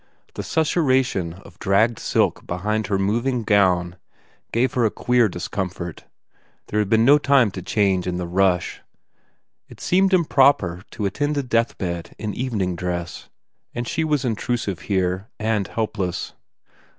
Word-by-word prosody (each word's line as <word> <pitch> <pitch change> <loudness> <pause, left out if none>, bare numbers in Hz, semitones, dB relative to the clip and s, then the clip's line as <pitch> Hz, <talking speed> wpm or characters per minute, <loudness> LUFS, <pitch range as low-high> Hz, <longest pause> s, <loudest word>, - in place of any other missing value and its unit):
The - - -5
sussuration 130 - +1
of - - -16
dragged 110 +4 +2
silk - - 0
behind 105 +4 -1
her 100 0 +1
moving 115 +5 0
gown 90 -4 +2 0.5
gave 120 +2 +1
her 125 - +1
a 110 - +4
queer 120 0 +2
discomfort; 90 -1 -5 0.6
there 105 - 0
had 105 -2 0
been 110 +1 +4
no 145 +3 +7
time 135 -7 +4
to 95 - -6
change 95 -1 +1
in 90 -1 -2
the 90 - -3
rush; 90 0 +1 0.9
it - - -14
seemed 190 +1 +2
improper 135 - +3
to 105 - -4
attend 145 +9 -1
a 140 - 0
death 115 -2 0
bed 85 -2 -4
in 105 -2 -4
evening 105 -8 -2
dress. 85 -1 -4 0.5
And 120 0 -3
she 160 - -1
was 150 -4 0
intrusive, 115 -4 -2
here, 95 0 -1
and 110 -3 0
helpless. 100 -6 -3
105 Hz, 150 wpm, -22 LUFS, 90-125 Hz, 0.9 s, no